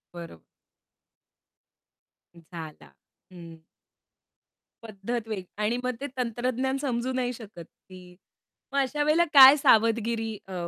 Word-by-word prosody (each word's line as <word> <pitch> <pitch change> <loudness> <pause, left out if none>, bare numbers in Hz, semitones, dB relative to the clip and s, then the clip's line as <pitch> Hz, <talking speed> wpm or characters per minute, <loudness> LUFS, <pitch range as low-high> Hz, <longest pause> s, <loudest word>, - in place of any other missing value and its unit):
बरो 165 - -10 2.0
झाला. 155 - -11 0.4
हं. 165 -2 -13 1.2
पद्धत 225 +2 -6
वेगळी 210 -4 -5 0.2
आणि 235 +3 0
मग 250 -1 -2
ते 285 - -4
तंत्रज्ञान 255 +2 -2
समजू 250 -2 -2
नाही 250 -1 -2
शकत 215 -7 -11 0.3
की 180 -1 -14 0.6
मग 280 - 0
अशा 295 +2 -1
वेळेला 315 +3 +2
काय 270 0 +10
सावधगिरी 225 -2 +1
अ, 180 -2 -5
230 Hz, 105 wpm, -26 LUFS, 185-255 Hz, 2.0 s, काय